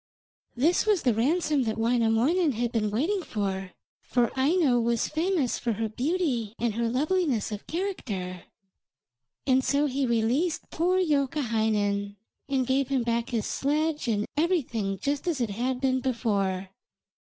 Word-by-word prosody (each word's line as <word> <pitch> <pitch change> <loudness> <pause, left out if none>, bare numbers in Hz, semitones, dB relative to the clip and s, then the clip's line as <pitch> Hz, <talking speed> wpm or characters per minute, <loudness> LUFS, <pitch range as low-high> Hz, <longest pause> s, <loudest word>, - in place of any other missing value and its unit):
This 325 - +2
was 410 -5 +3
the 245 - +3
ransom 295 +5 +1
that 220 0 -2
Wainamoinen 240 +8 +2
had 235 +1 -1
been 215 -2 0
waiting 320 - 0
for, 195 - -3 0.3
for 240 -2 +1
Aino 275 -2 +3
was 235 0 +1
famous 320 -4 0
for 235 - -1
her 220 +1 -2
beauty 250 - -1
and 230 -3 -1 0.2
loveliness 290 - 0
of 210 -1 -6
character, 210 - -4 1.0
and 260 -1 +3
so 280 +2 +2
he 270 -1 0
released 240 +9 0
poor 360 +3 +1
Youkahainen 220 - 0 0.3
and 265 -2 +1
gave 265 +1 +1
him 265 -3 0
back 235 0 -1
his 225 -4 -1
sledge 300 0 -1
and 210 -2 +1
everything 250 - 0
just 285 - -2
as 325 -6 0
it 235 -4 -1
had 250 +5 -1
been 260 -1 +1
before. 200 -7 -1
250 Hz, 145 wpm, -27 LUFS, 225-300 Hz, 1.0 s, was